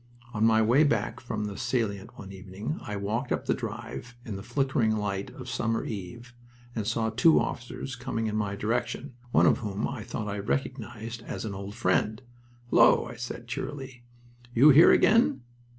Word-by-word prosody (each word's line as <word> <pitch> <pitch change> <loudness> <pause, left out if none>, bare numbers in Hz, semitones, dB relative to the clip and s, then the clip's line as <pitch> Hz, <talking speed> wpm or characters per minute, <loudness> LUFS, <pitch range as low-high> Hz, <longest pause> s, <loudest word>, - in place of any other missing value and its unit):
On 110 -1 0
my 110 0 +5
way 125 +7 +5
back 115 -4 0
from 110 -3 -4
the 100 -1 -5
salient 115 -5 -2
one 95 -1 -9
evening 100 - -6
I 105 - -5
walked 110 +6 -2
up - - -1
the - - +2
drive 120 +1 -6
in 110 - -5
the 95 - -6
flickering 120 -1 +1
light 100 -2 -2
of 130 - -9
summer 115 -2 -1
eve, 115 +4 -7 0.4
and 110 -3 -2
saw 115 -1 0
two 120 +8 +5
officers 125 +2 -4
coming 120 -2 -3
in 105 -1 -2
my 105 -2 -1
direction, 120 +5 -2 0.2
one - - +5
of - - +4
whom 105 -1 -2
I 130 -5 -5
thought 110 0 -5
I 100 0 -3
recognized 110 - -3
as - - -4
an 105 - -4
old 100 +1 -7
friend. 110 0 +1 0.5
"Hullo!" 115 - +6
I 120 - -8
said, 120 0 -6
cheerily. 130 0 -6 0.5
"You 140 +6 +8
here 150 +5 +8
again?" 210 - +4
115 Hz, 180 wpm, -28 LUFS, 105-120 Hz, 0.5 s, You